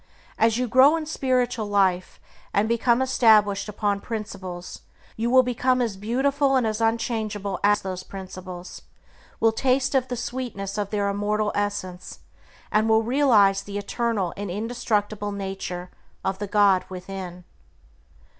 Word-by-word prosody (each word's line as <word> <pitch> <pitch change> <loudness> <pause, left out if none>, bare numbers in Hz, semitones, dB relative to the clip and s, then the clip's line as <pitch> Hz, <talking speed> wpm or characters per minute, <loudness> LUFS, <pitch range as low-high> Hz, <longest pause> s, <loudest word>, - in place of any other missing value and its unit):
As 225 0 +3
you 250 0 0
grow 260 +6 +6
in 320 -1 -3
spiritual 250 -6 0
life, 190 -3 +1 0.4
and 205 +2 +3
become 235 +2 +2
established 215 -5 +3
upon 205 -1 -1
principles, 195 -6 -6 0.3
you 230 +2 -1
will 255 +1 +6
become 250 +1 +1
as 230 -5 -1
beautiful 270 +7 +1
and 255 -3 +2
as 215 0 -2
unchangeable 220 -3 -1
as 205 0 +3
those 185 -1 -4
principles, 185 -2 -9 0.6
will 225 - +4
taste 260 +3 +1
of 260 -2 +2
the 245 - -4
sweetness 230 -5 -4
of 205 -1 -2
their 205 -1 0
immortal 210 +1 0
essence, 185 -3 -4 0.5
and 215 +1 +2
will 220 0 +4
realize 220 -6 +4
the 205 0 -6
eternal 205 -3 -1
and 200 -1 -5
indestructible 210 0 -2
nature 190 -2 -5 0.3
of 190 0 -1
the 205 - -3
God 200 -2 +4
within. 185 -1 -7
210 Hz, 140 wpm, -24 LUFS, 195-240 Hz, 0.6 s, grow